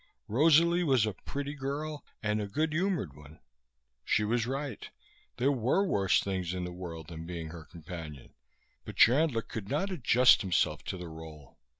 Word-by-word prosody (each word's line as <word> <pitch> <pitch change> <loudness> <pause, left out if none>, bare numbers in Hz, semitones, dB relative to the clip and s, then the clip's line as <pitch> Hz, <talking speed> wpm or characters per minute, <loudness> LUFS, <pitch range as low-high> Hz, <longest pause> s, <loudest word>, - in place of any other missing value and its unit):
Rosalie 165 +8 +4
was 130 -8 +3
a 105 - -2
pretty 140 +9 -5
girl, 145 +2 -4 0.2
and 105 0 0
a 105 - -3
good 155 +9 -1
humored 165 - -1
one. 75 +1 -14 0.7
She 105 - +2
was 115 +2 0
right. 135 -2 -4 0.5
There 130 +3 +3
were 135 - +2
worse 100 - +2
things 95 -2 -2
in 90 - -3
the 90 - -4
world 85 -3 -8
than 80 0 -8
being 85 -2 -5
her 80 -1 -9
companion; 80 -4 -9 0.5
but - - -9
Chandler 125 -1 +4
could 105 -3 -7
not 190 +8 -1
adjust 125 -6 +5
himself 95 -3 0
to - - -4
the 90 -1 -7
role. 80 -3 -11
110 Hz, 170 wpm, -30 LUFS, 85-145 Hz, 0.7 s, adjust